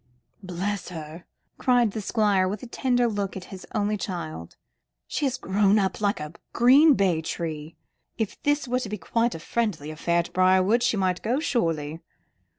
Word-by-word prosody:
"Bless 190 +1 -3
her!" 160 0 -8 0.3
cried 245 -4 +3
the 220 - -4
Squire, 200 -3 +2
with 200 +4 -4
a - - -7
tender 245 0 +1
look 200 -3 -3
at 185 - -7
his 185 - -9
only 210 0 +1
child, 160 - -6 0.5
"she - - -2
has 265 -1 0
grown 200 -2 +2
up 195 0 0
like 205 -3 +1
a 150 +1 -6 0.2
green 275 +5 +6
bay 180 -6 +2
tree. 160 -1 -5 0.4
But 220 -3 0
if - - -19
this 290 -1 +1
were 250 +1 0
to 230 - -5
be 210 - -3
quite 230 +4 0
a - - -6
friendly 165 -6 -2
affair 170 +2 0
at 170 - -1
Briarwood, 185 +5 +4
she 225 - +1
might 185 -2 0
go, 245 +5 0
surely." 165 - -1
200 Hz, 180 wpm, -25 LUFS, 170-235 Hz, 0.5 s, green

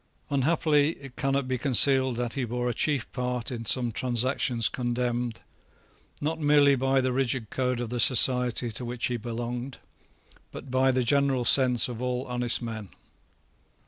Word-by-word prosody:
Unhappily 150 +1 +1
it 135 -2 -14
cannot 135 -1 -2
be 130 -1 -3
concealed 130 -1 +4
that 120 -1 -4
he 135 - -3
bore 120 +1 -4
a 120 - -1
chief 140 -1 -1
part 125 -1 -3
in 115 -2 -6
some 120 +1 0
transactions 125 0 -1
condemned, 120 -1 -3 0.8
not 160 +2 -3
merely 145 -2 +3
by 135 0 0
the 130 -1 -2
rigid 125 -4 -2
code 125 -2 -2
of 120 -2 -5
the 120 +1 -4
society 125 0 +4
to 115 - -2
which 120 0 -4
he 125 - -2
belonged, 120 +3 -6 0.7
but 130 - -11
by 130 +1 +2
the 130 -1 0
general 135 0 +1
sense 125 -3 +5
of 120 -1 -8
all 125 +1 -3
honest 125 0 0
men. 110 -4 -7
125 Hz, 160 wpm, -26 LUFS, 120-135 Hz, 0.8 s, sense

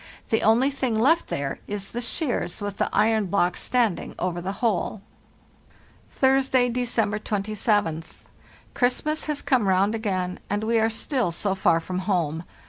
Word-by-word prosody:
The 225 - +2
only 240 +6 +4
thing 260 -5 -1
left 320 +8 +3
there 140 -1 -3
is 205 -1 -5
the 240 - -4
shears 245 - -2
with 205 -1 -5
the - - +1
iron 220 -2 +2
block 180 -1 +1
standing 235 -7 0
over 175 -1 -2
the 190 +3 -3
hole. 215 -2 -1 1.1
"Thursday, 265 -2 +2
December 230 -4 0
27th. 205 -5 -1 0.5
Christmas 300 +5 +1
has 300 -2 0
come 245 -7 +2
round 190 +3 +3
again, 185 -5 -2
and 205 +1 -1
we 230 +1 +2
are 220 0 +3
still 225 - 0
so 190 +3 -1
far 175 -3 +2
from 180 +2 -4
home. 175 -4 -1
215 Hz, 150 wpm, -24 LUFS, 185-245 Hz, 1.1 s, only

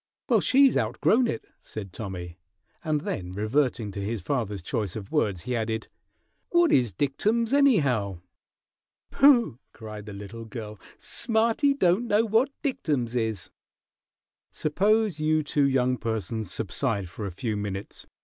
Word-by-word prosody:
"Well, - - +4
she's 270 -1 +5
outgrown 245 +2 +2
it," - - -4 0.2
said 100 -4 -8
Tommy; 90 -4 -6 0.4
and 155 -3 0
then 90 -7 -4
reverting 110 +1 0
to 100 - -5
his 110 +3 -2
father's 105 - -2
choice 100 0 -2
of 100 -3 -7
words, 95 -5 0
he 125 +4 -3
added, 110 0 -2 0.6
"What 345 -2 +4
is 120 -5 +3
dictums, 215 - 0
anyhow?" 140 - +3 0.9
"Pooh!" 245 - +5
cried 105 -2 -9
the 105 - -7
little 105 +3 -8
girl. 110 -3 -8 0.2
"Smarty 235 +4 +1
don't 190 0 +2
know 215 +1 +3
what 225 +5 +3
dictums 145 - -1
is!" 110 -5 -2 1.0
"Suppose 205 +3 +1
you 155 0 +2
two 145 -1 +2
young 130 -1 +1
persons 110 -2 -3
subside 100 -1 -1
for 100 +5 -6
a - - -5
few 110 +5 -3
minutes!" 100 -1 -6
120 Hz, 140 wpm, -26 LUFS, -, 1.0 s, she's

